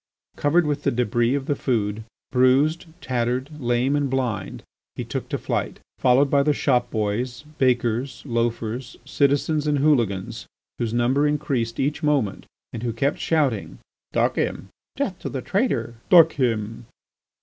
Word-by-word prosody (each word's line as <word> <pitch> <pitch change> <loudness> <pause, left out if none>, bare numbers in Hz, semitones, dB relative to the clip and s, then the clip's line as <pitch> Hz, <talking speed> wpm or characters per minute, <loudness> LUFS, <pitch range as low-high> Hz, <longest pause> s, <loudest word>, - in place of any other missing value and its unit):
Covered 160 +4 +2
with 145 -1 -1
the - - +1
débris 120 +2 +1
of 135 - -5
the 145 - 0
food, 110 -5 -1 0.3
bruised, 135 +7 +3
tattered, 125 +2 -1
lame, 120 +3 +1
and 145 -2 0
blind, 125 -4 -2 0.3
he - - -4
took - - -5
to - - -1
flight, - - -3 0.2
followed 130 +2 +4
by 140 0 +3
the 150 +1 +2
shop 125 -4 +1
boys, 120 +4 -2 0.2
bakers, 120 -1 0
loafers, 115 0 -2
citizens, 145 +2 +1
and 150 -1 +2
hooligans 120 -10 0 0.3
whose 115 -2 -1
number 125 +5 +2
increased 135 -6 -1
each 145 +4 0
moment 145 - 0 0.3
and 115 - -5
who 120 -1 -2
kept 140 +6 0
shouting: 140 -10 0 0.3
"Duck - - +1
him! - - -2 0.3
Death - - -2
to - - -5
the - - -5
traitor! 115 - 0 0.2
Duck 165 -3 +8
him!" 115 -3 -2
125 Hz, 150 wpm, -23 LUFS, 115-145 Hz, 0.3 s, Duck